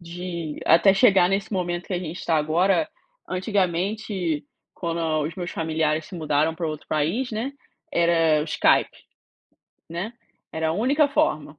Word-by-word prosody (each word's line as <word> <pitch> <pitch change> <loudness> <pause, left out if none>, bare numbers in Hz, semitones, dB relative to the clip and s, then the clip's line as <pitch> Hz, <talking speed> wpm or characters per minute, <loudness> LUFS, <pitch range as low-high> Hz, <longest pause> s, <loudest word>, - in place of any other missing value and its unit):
de 170 -2 -6
até 180 +4 +6
chegar 195 -5 +5
nesse 195 +3 -1
momento 175 -2 -2
que - - -6
a 180 - 0
gente 175 -1 -6
está 165 - 0
agora, 175 - +2 0.4
antigamente, 185 -3 -1 0.3
quando 170 -1 -3 0.3
os 160 - -6
meus 175 -2 -5
familiares 160 -1 -1
se - - -11
mudaram 155 -1 +1
para 165 0 -3
outro 155 -1 -6
país, 170 - 0
né, 230 +6 -3 0.4
era 165 -2 +3
o - - -3
Skype, 155 - +3 1.0
né. 175 +7 -4 0.4
Era 160 0 -1
a - - +1
única 270 - +3
forma. 155 - 0
170 Hz, 150 wpm, -24 LUFS, 160-195 Hz, 1.0 s, até